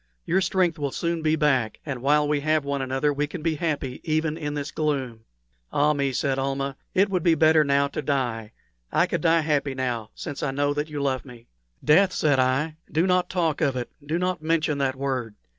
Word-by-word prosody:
Your 190 - +2
strength 180 -3 +1
will 145 -1 -1
soon 170 +4 -2
be 155 0 +2
back, 135 -8 +1
and 135 -5 -4
while 150 +2 +3
we 150 0 +1
have 155 0 +1
one 140 -1 -1
another 135 +3 0
we 145 +1 -1
can 155 +1 -7
be 165 -1 +1
happy 145 -5 -3
even 155 -1 0
in 150 -2 -4
this 145 0 -4
gloom." 135 -7 -2 0.5
"Ah 150 +1 +3
me," 140 -2 0
said 135 +1 0
Almah, 135 0 -2 0.2
"it 195 +2 +4
would 185 -2 +1
be 165 0 +4
better 155 0 +5
now 140 0 +2
to 155 - -4
die. 120 -7 -2 0.4
I - - +3
could - - -2
die 165 -1 +4
happy 145 -3 0
now, 120 -4 -2
since 145 - -6
I 145 - 0
know 145 +1 0
that 150 +1 -3
you 145 -2 -3
love 130 -2 0
me." 120 -3 -13 0.4
"Death!" 185 +5 +5
said 145 -3 +2
I; 135 +5 +1
"do 160 +4 +2
not 180 -1 +2
talk 165 -5 0
of 140 -4 +2
it 125 -1 -4
do 155 +3 -1
not 180 -1 -1
mention 155 -2 0
that 135 -1 0
word. 130 -5 -3
145 Hz, 215 wpm, -25 LUFS, 135-160 Hz, 0.5 s, better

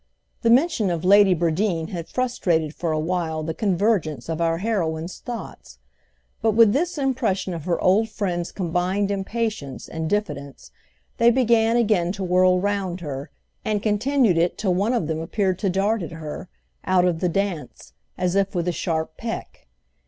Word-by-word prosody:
The 230 - +2
mention 245 - +3
of 170 -1 -2
Lady 200 -1 +6
Bradeen 170 0 0
had 170 -3 -5
frustrated 175 -11 0
for 170 -1 -2
a 155 - 0
while 160 -1 -1
the 160 +1 -3
convergence 175 - 0
of 165 0 -2
our 165 0 +1
heroine's 170 -5 -2
thoughts; 240 -2 -8 0.6
but 220 -1 +2
with 220 -1 +6
this 340 +4 0
impression 245 -9 0
of 165 -2 -6
her 175 -2 0
old 210 +5 +3
friend's 180 -5 -3
combined 185 +3 -1
impatience 200 - -3
and 160 -1 -4
diffidence 150 -10 -3 0.5
they 235 0 +6
began 235 -2 +3
again 205 -7 +2
to 195 -1 -5
whirl 185 0 +4
round 195 -2 -2
her, 145 -2 -5 0.3
and 210 -1 -1
continued 220 -2 +2
it 170 +1 +1
till 190 -4 +1
one 200 +7 +1
of 225 - 0
them 160 0 -2
appeared 185 +2 -1
to 195 - 0
dart 200 +4 +1
at 170 - -6
her, 160 +2 -7 0.3
out 185 -1 +3
of 175 -3 +1
the 180 - +1
dance, 170 - -3 0.2
as 180 -1 0
if 195 0 +1
with 175 0 -1
a - - +2
sharp 160 -2 -2
peck. 230 - -6
185 Hz, 170 wpm, -23 LUFS, 165-215 Hz, 0.6 s, Lady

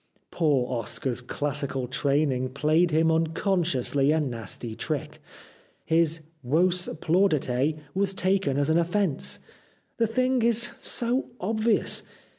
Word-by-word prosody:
Poor 145 -7 +1
Oscar's 125 +3 -3
classical 140 0 -3
training 135 0 0
played 155 +6 +2
him 160 +1 +3
unconsciously 160 - +1
a 160 - +2
nasty 115 -4 -4
trick. - - -4 0.6
His 165 0 +2
" 155 -3 -40
Vos 175 +7 +2
Plaudite 155 -5 +1
" 145 - -30
was 195 0 0
taken 190 -7 +1
as 145 +2 +1
an 165 - +4
offence. 175 -3 +1 0.6
The 230 - +2
thing 255 +2 +1
is 235 +1 +2
so 245 +3 0
obvious. 220 +3 +1
160 Hz, 120 wpm, -26 LUFS, 140-190 Hz, 0.6 s, an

